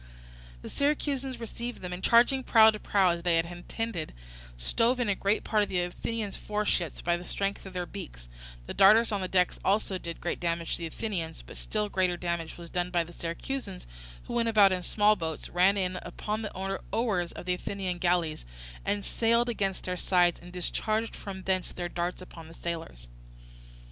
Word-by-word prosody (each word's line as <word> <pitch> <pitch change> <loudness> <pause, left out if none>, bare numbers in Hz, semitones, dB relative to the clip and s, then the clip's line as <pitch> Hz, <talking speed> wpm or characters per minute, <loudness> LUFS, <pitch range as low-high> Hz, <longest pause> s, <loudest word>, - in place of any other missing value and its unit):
The - - -6
Syracusans 280 -2 0
received 235 +1 -6
them, 180 -1 -5
and 180 +1 -6
charging 245 +3 +5
prow 220 -2 +7
to 215 - -6
prow 195 -3 +3
as 170 0 -2
they 175 -1 +2
had 165 0 +2
intended, 175 +1 -4 0.4
stove 230 - +2
in 245 - +1
a - - +4
great 200 +2 +1
part 215 -2 +2
of 205 - 0
the 180 - 0
Athenian 205 +4 -3
foreships 210 -6 -1
by 175 0 +1
the 175 - -8
strength 195 +2 -2
of 190 - -10
their 180 -1 -2
beaks; - - -9 0.4
the - - -5
darters 220 +4 +6
on 205 -2 0
the 185 - -1
decks 180 -1 +2
also 195 -1 +1
did 170 -1 -6
great 175 - -2
damage 170 -1 -1
to - - 0
the 170 - -3
Athenians, 165 -3 -4
but - - -11
still 210 -1 -2
greater 185 -3 +1
damage 170 -2 -3
was 170 -1 -9
done 180 0 -1
by 175 -2 +2
the 170 +1 -12
Syracusans 170 - -5 0.4
who - - -7
went 230 -1 +2
about 205 -3 +6
in 185 -1 0
small 210 +3 +3
boats, 160 -5 -4
ran 185 +3 +4
in 185 -1 -1
upon 215 +1 -4
the 215 - -4 0.4
oars 205 -7 0
of - - -8
the 180 - +1
Athenian 185 -1 -3
galleys, 175 -3 +1 0.4
and 205 -1 -1
sailed 235 +1 +2
against 195 -5 -1
their 180 0 -3
sides, 175 -1 +3
and 175 - -11
discharged 215 +5 -1
from 190 -2 -7
thence 185 -1 0
their 175 -1 -4
darts 175 +1 -3
upon 165 -3 -11
the 165 - -13
sailors. 160 - -5
185 Hz, 195 wpm, -29 LUFS, 175-215 Hz, 0.4 s, prow